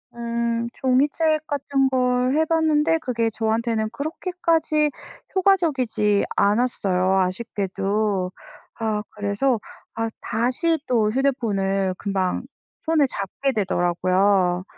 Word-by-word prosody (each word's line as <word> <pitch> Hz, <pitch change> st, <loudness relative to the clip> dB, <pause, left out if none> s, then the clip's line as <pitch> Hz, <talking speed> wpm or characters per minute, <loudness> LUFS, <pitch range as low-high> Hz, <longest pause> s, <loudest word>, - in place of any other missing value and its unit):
음. 235 Hz, 0 st, -1 dB
종이책 295 Hz, +4 st, +1 dB
같은 275 Hz, -1 st, 0 dB
걸 250 Hz, -1 st, +1 dB, 0.2 s
해 315 Hz, +1 st, +3 dB
봤는데 320 Hz, -1 st, +2 dB
그게 235 Hz, -6 st, -1 dB
저한테는 220 Hz, 0 st, -1 dB
그렇게까지 320 Hz, 0 st, 0 dB, 0.5 s
효과적이지 280 Hz, -, +2 dB
않았어요, 195 Hz, -4 st, +2 dB
아쉽게도. 195 Hz, 0 st, -1 dB, 0.5 s
아 215 Hz, -2 st, -1 dB
그래서 210 Hz, +4 st, 0 dB, 0.3 s
아 225 Hz, 0 st, -2 dB
다시 255 Hz, +9 st, 0 dB
또 225 Hz, -4 st, +2 dB
휴대폰을 200 Hz, -8 st, 0 dB
금방 190 Hz, -1 st, -1 dB, 0.4 s
손에 315 Hz, -3 st, +3 dB
잡게 250 Hz, +5 st, -3 dB
되더라고요. 185 Hz, -2 st, +1 dB
235 Hz, 235 characters per minute, -23 LUFS, 200-280 Hz, 0.5 s, 해